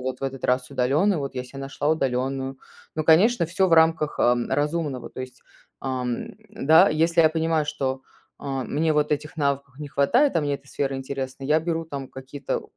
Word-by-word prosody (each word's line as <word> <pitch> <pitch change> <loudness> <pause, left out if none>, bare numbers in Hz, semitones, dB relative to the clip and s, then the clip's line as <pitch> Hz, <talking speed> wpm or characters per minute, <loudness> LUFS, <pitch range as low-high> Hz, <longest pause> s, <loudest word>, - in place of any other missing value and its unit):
вот 130 0 -4
в - - -12
этот 135 -1 -5
раз 125 0 +1
удалённую, 155 +10 +2
вот 140 -2 -4
я 125 -1 -4
себе 135 +2 -11
нашла 135 +1 -3
удалённую. 135 -2 -1 0.4
Ну, 155 - -2
конечно, 175 +6 +5
всё 185 +3 +1
в - - -1
рамках, 160 -2 +3
а, 120 - +4
разумного. 145 -4 -1
То - - -8
есть, 130 0 -9 0.4
ам, 125 -2 -3 0.2
да, 160 +7 +5
если 165 +2 +2
я 160 - +6
понимаю, 160 -1 0
что, 135 -3 -2 0.4
а, 135 -2 -3
мне 155 +4 0
вот 150 0 +1
этих 150 +2 -3
навыков 140 -2 -2
не 150 - -6
хватает, 140 - +3
а 165 - +3
мне 145 -1 -1
эта 140 - -10
сфера 135 -1 -2
интересна, 135 0 -5
я 150 +3 +3
беру 165 0 -2
там 140 -4 -6
какие-то 135 +1 -5
140 Hz, 195 wpm, -24 LUFS, 135-160 Hz, 0.4 s, я